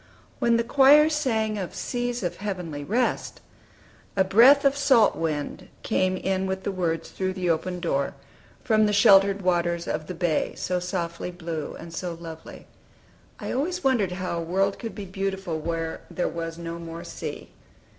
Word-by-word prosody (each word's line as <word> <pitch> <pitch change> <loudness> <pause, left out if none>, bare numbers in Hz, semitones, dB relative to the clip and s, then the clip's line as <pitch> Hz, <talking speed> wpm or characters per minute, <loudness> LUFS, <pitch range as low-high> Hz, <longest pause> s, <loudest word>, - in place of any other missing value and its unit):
When 235 -1 +3
the 230 - +1
choir 285 +5 +6
sang 220 -8 0
of 185 - -5
"Seas 245 -2 -3
of 175 - -2
heavenly 180 -8 -4
rest," 235 - -1 0.8
a 190 - +4
breath 245 +9 +6
of 275 0 +4
salt 265 -6 +4
wind 150 -3 -3 0.2
came 185 -3 +1
in 190 0 -1
with 190 0 -3
the 200 - -1
words 170 -3 -2
through 185 0 -2
the 180 -2 0
open 180 +3 -2
door, 140 -6 -1 0.5
from 215 -2 +3
the 210 - 0
sheltered 200 0 +5
waters 170 -1 0
of 155 0 -3
the 180 - -5
bay, 165 -2 0
so 180 0 -1
softly 175 -1 -3
blue 165 -4 -5
and 165 0 -10
so 175 0 -4
lovely, 165 -1 -10 0.7
I - - -4
always 350 +8 -2
wondered 225 -9 +2
how 180 -2 -3
a - - -3
world 195 +4 0
could 230 - -6
be 205 - -6
beautiful 190 -3 -3
where 165 0 -3
"there 180 - -1
was 165 -1 -5
no 170 0 -6
more 165 0 -7
sea." 175 - -7
185 Hz, 170 wpm, -25 LUFS, 170-215 Hz, 0.8 s, choir